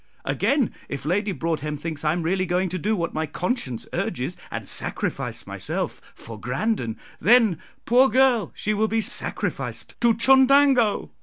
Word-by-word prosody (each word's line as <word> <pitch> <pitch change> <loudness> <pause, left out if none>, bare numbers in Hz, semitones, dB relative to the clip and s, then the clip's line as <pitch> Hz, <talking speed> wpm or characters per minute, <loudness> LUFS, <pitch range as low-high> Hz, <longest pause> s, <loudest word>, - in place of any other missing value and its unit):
Again, 275 -5 +1 0.2
if 140 0 -5
Lady 200 +6 0
Broadhem 155 -4 -2
thinks 155 0 -5
I 150 - +2
am 170 +1 -2
really 185 +3 0
going 180 +1 0
to 185 +1 -3
do 215 +5 0
what 170 -4 -2
my 160 0 -2
conscience 155 - -3
urges, - - -2
and - - -6
sacrifice - - -3
myself - - -3
for 115 -2 -10
Grandon, 125 - -2 0.2
then, 220 -6 +4 0.3
poor 255 +3 +5
girl, 255 -4 +3
she 215 - -1
will 215 +1 +1
be 225 +1 0
sacrificed - - -3
to 235 -1 +4
Chundango. 265 - +4
195 Hz, 155 wpm, -24 LUFS, 155-235 Hz, 0.3 s, poor